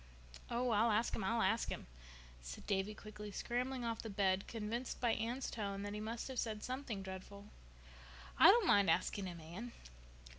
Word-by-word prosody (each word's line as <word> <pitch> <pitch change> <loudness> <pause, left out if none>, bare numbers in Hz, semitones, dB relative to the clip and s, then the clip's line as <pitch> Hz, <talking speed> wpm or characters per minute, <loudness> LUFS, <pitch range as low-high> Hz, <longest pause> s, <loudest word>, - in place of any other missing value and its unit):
"Oh—I'll 235 -2 +3
ask 220 +2 +2
Him—I'll 225 +3 +1
ask 225 - +2
Him," - - -4 0.6
said - - -8
Davy 200 +1 0
quickly, 210 0 -8
scrambling 245 +4 -2
off 230 -1 -2
the 225 - -6
bed, 195 -1 +1
convinced 230 +3 -3
by 240 -2 +3
Anne's 240 +4 -2
tone 200 -3 -3
that 205 0 -4
he 210 - -3
must 225 +2 -4
have 260 -2 -3
said 215 -2 -2
something 255 -6 -3
dreadful. 190 +2 -8 0.9
"I - - +10
don't 445 +1 +7
mind 200 - +5
asking 185 +3 +1
Him, 175 -2 -6
Anne. 180 +10 -7
215 Hz, 170 wpm, -38 LUFS, 200-235 Hz, 0.9 s, I